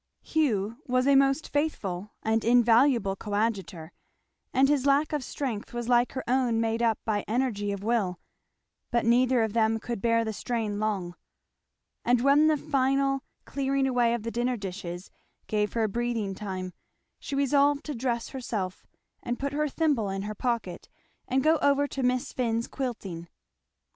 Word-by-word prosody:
Hugh 230 Hz, -9 st, 0 dB
was 255 Hz, 0 st, +2 dB
a 280 Hz, -, +5 dB
most 275 Hz, +2 st, +3 dB
faithful 210 Hz, -, -2 dB
and 220 Hz, 0 st, +1 dB
invaluable 235 Hz, -2 st, +4 dB
coadjutor, 195 Hz, -6 st, -2 dB, 0.6 s
and 270 Hz, +1 st, +4 dB
his 285 Hz, -1 st, +2 dB
lack 285 Hz, +3 st, +3 dB
of 295 Hz, -3 st, -1 dB
strength 240 Hz, -6 st, -4 dB
was 240 Hz, -1 st, -3 dB
like 245 Hz, 0 st, +3 dB
her 260 Hz, -, -4 dB
own 245 Hz, -2 st, +2 dB
made 225 Hz, 0 st, 0 dB
up 230 Hz, -2 st, +2 dB
by 210 Hz, -2 st, 0 dB
energy 220 Hz, -4 st, -1 dB
of 200 Hz, -1 st, -5 dB
will; 205 Hz, -6 st, 0 dB, 0.7 s
but 235 Hz, -2 st, +1 dB
neither 245 Hz, 0 st, +4 dB
of 220 Hz, -2 st, -2 dB
them 225 Hz, -1 st, +2 dB
could 235 Hz, -3 st, -5 dB
bear 230 Hz, 0 st, +2 dB
the 220 Hz, -, -3 dB
strain 215 Hz, -2 st, -2 dB
long; 200 Hz, -5 st, -2 dB, 0.9 s
and 245 Hz, 0 st, +3 dB
when 280 Hz, +3 st, +5 dB
the 310 Hz, -1 st, +3 dB
final 275 Hz, -1 st, +1 dB, 0.2 s
clearing 275 Hz, 0 st, 0 dB
away 245 Hz, -3 st, +2 dB
of 235 Hz, -, -5 dB
the 230 Hz, -, -3 dB
dinner 245 Hz, +1 st, 0 dB
dishes 185 Hz, -2 st, -6 dB, 0.3 s
gave 210 Hz, -1 st, -1 dB
her 230 Hz, -, +1 dB
a -, -, +2 dB
breathing 230 Hz, -2 st, -2 dB
time 185 Hz, -2 st, -5 dB, 0.5 s
she 280 Hz, -, -5 dB
resolved 280 Hz, +1 st, +3 dB
to 300 Hz, -, -3 dB
dress 235 Hz, -2 st, -2 dB
herself 215 Hz, -8 st, -4 dB, 0.3 s
and 240 Hz, 0 st, -3 dB
put 280 Hz, +1 st, -3 dB
her 300 Hz, +1 st, +1 dB
thimble 280 Hz, -9 st, +1 dB
in 195 Hz, 0 st, -3 dB
her 210 Hz, +1 st, -4 dB
pocket 225 Hz, -5 st, -3 dB, 0.4 s
and 260 Hz, +1 st, +1 dB
go 320 Hz, +1 st, +4 dB
over 285 Hz, 0 st, +2 dB
to 275 Hz, -, -4 dB
Miss 250 Hz, 0 st, 0 dB
Finn's 230 Hz, -2 st, -1 dB
quilting. 195 Hz, -10 st, -5 dB
235 Hz, 165 wpm, -27 LUFS, 210-270 Hz, 0.9 s, a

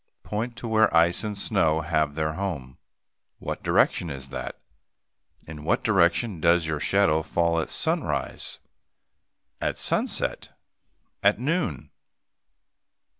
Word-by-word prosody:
Point 115 Hz, +3 st, -3 dB
to 120 Hz, -, -6 dB
where 110 Hz, -1 st, +4 dB
ice 85 Hz, +4 st, +3 dB
and 105 Hz, -2 st, -3 dB
snow 80 Hz, -7 st, +1 dB
have 75 Hz, -2 st, 0 dB
their 80 Hz, 0 st, -1 dB
home. 80 Hz, -9 st, -5 dB, 0.6 s
What -, -, -5 dB
direction 85 Hz, -, +2 dB
is 65 Hz, -2 st, -7 dB
that? 65 Hz, -, -6 dB, 0.9 s
In 75 Hz, -1 st, -9 dB
what 80 Hz, -, +1 dB
direction 95 Hz, 0 st, +2 dB
does 85 Hz, 0 st, +4 dB
your 80 Hz, -1 st, -2 dB
shadow 80 Hz, -5 st, +3 dB
fall 85 Hz, +1 st, +1 dB
at -, -, -5 dB
sunrise? -, -, -2 dB, 1.0 s
At -, -, -1 dB
sunset? -, -, -2 dB, 0.6 s
At 100 Hz, +1 st, +4 dB
noon? 135 Hz, -, -1 dB
85 Hz, 120 wpm, -26 LUFS, 80-100 Hz, 1.0 s, where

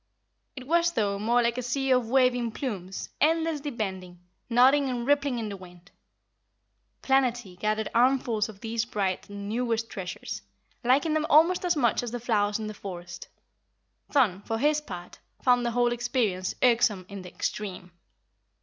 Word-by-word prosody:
It 260 Hz, -2 st, -8 dB
was, 340 Hz, +3 st, +2 dB
though, 200 Hz, -4 st, 0 dB
more 240 Hz, +3 st, +2 dB
like 235 Hz, +1 st, 0 dB
a -, -, -1 dB
sea 265 Hz, +2 st, -1 dB
of 250 Hz, -3 st, +2 dB
waving 250 Hz, -3 st, +2 dB
plumes, 195 Hz, -9 st, -5 dB
endlessly 320 Hz, -1 st, +1 dB
bending, 190 Hz, -7 st, -5 dB, 0.3 s
nodding 265 Hz, +4 st, +5 dB
and 240 Hz, -2 st, -3 dB
rippling 280 Hz, -2 st, +2 dB
in 220 Hz, -2 st, -3 dB
the 200 Hz, -, -5 dB
wind. 180 Hz, -1 st, -15 dB, 1.1 s
Planetty 245 Hz, -7 st, +1 dB
gathered 215 Hz, 0 st, -1 dB
armfuls 235 Hz, -3 st, +2 dB
of 200 Hz, -2 st, -12 dB
these 225 Hz, -1 st, -1 dB
bright 200 Hz, -4 st, -2 dB
and 200 Hz, 0 st, -7 dB
newest 230 Hz, 0 st, -1 dB
treasures, 180 Hz, -, -6 dB, 0.4 s
liking 275 Hz, +6 st, +3 dB
them 310 Hz, 0 st, 0 dB
almost 330 Hz, +5 st, +5 dB
as 355 Hz, -1 st, +2 dB
much 240 Hz, -6 st, +2 dB
as 245 Hz, -, -4 dB
the 245 Hz, +1 st, -4 dB
flowers 210 Hz, -3 st, +1 dB
in 220 Hz, -, -5 dB
the 215 Hz, -, -5 dB
forest. 175 Hz, -4 st, -8 dB, 0.8 s
Thun, 215 Hz, -10 st, +2 dB
for 225 Hz, +2 st, -3 dB
his 300 Hz, +4 st, +2 dB
part, 180 Hz, -10 st, -9 dB, 0.2 s
found 245 Hz, -1 st, +4 dB
the 240 Hz, -, 0 dB
whole 240 Hz, 0 st, +2 dB
experience 235 Hz, -6 st, -1 dB
irksome 230 Hz, -6 st, +3 dB
in 200 Hz, -1 st, -8 dB
the 180 Hz, -, -9 dB
extreme. 185 Hz, -1 st, -5 dB
235 Hz, 160 wpm, -27 LUFS, 200-260 Hz, 1.1 s, nodding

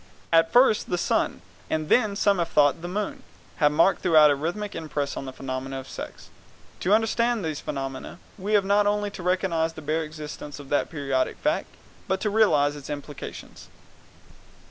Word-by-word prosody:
At 165 Hz, 0 st, +5 dB
first 245 Hz, -3 st, +4 dB
the 175 Hz, -, 0 dB
sun, 90 Hz, -, 0 dB, 0.3 s
and 155 Hz, -1 st, -1 dB
then, 215 Hz, 0 st, +3 dB
as 200 Hz, -, -5 dB
some 200 Hz, -3 st, +3 dB
have 170 Hz, -, 0 dB
thought, 145 Hz, +1 st, +3 dB
the 175 Hz, -, -5 dB
moon, 200 Hz, +3 st, -3 dB, 0.4 s
have 150 Hz, -3 st, +4 dB
marked 165 Hz, +5 st, +3 dB
throughout 155 Hz, -4 st, +6 dB
a -, -, +2 dB
rhythmic 175 Hz, +8 st, -3 dB
impress 145 Hz, -3 st, -3 dB
on -, -, -5 dB
the 130 Hz, -, -6 dB
phenomena 130 Hz, 0 st, -5 dB
of 135 Hz, -, -10 dB
sex. -, -, -9 dB, 0.5 s
To 185 Hz, -, -1 dB
understand 225 Hz, -1 st, +1 dB
these 155 Hz, -2 st, -3 dB
phenomena 135 Hz, +1 st, -5 dB, 0.2 s
we 205 Hz, +2 st, -3 dB
have 205 Hz, -2 st, +4 dB
not 205 Hz, +1 st, +3 dB
only 205 Hz, 0 st, 0 dB
to 185 Hz, -, -8 dB
recognize 175 Hz, -3 st, 0 dB
the 155 Hz, -, -10 dB
bare 155 Hz, +2 st, 0 dB
existence 150 Hz, -1 st, -8 dB
of 140 Hz, -2 st, -11 dB
that 145 Hz, -, +1 dB
periodic 135 Hz, -4 st, -1 dB
fact, -, -, 0 dB, 0.4 s
but 190 Hz, 0 st, 0 dB
to 210 Hz, -, 0 dB
realize 150 Hz, -10 st, +3 dB
its 145 Hz, -2 st, -10 dB
implications. 145 Hz, 0 st, -8 dB
165 Hz, 185 wpm, -25 LUFS, 145-200 Hz, 0.5 s, throughout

